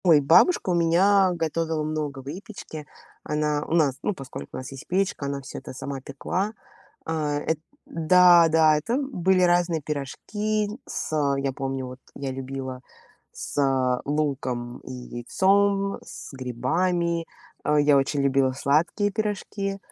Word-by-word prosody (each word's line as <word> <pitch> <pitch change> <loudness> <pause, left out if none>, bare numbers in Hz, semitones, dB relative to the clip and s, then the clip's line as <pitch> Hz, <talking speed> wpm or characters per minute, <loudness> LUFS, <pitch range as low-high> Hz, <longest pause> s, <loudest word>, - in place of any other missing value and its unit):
Ой, 165 -4 +7
бабушка 175 - +4
у - - +2
меня 185 +3 +4
готовила 160 -1 -1
много 150 -2 -3
выпечки. 155 0 -8 0.4
Она 150 0 0
у - - -3
нас 145 -6 +3
ну 210 - 0
поскольку 130 - -8
у - - -5
нас 130 - -7
есть 135 -1 -10
печка, 185 -5 0
она 140 0 -3
всё 135 - -8
это - - -9
сама 135 +1 -5
пекла. 180 +10 -3 0.5
А, 155 -2 -1
эт 160 +1 -1 0.3
Да, 175 +1 +6
да, 155 -1 +5
это, 155 +10 -2
м, 275 +1 -1
были 185 -3 +2
разные 175 -2 +3
пирожки 205 +9 -2 0.2
с 240 -9 -3 0.2
я 135 0 -1
помню 135 -1 -3
вот, 125 +1 -9 0.2
я 135 -1 -4
любила 130 -1 -6 0.5
с 130 -3 0
луком 130 -5 -2
и - - -10
яйцом, 195 +11 +1
с - - -10
грибами. 165 +7 -1 0.4
А, 150 0 +3
я 145 -1 +5
очень 140 +1 +1
любила 135 -1 +2
сладкие 155 +10 +1
пирожки. 200 -1 -3
155 Hz, 145 wpm, -25 LUFS, 135-180 Hz, 0.5 s, Ой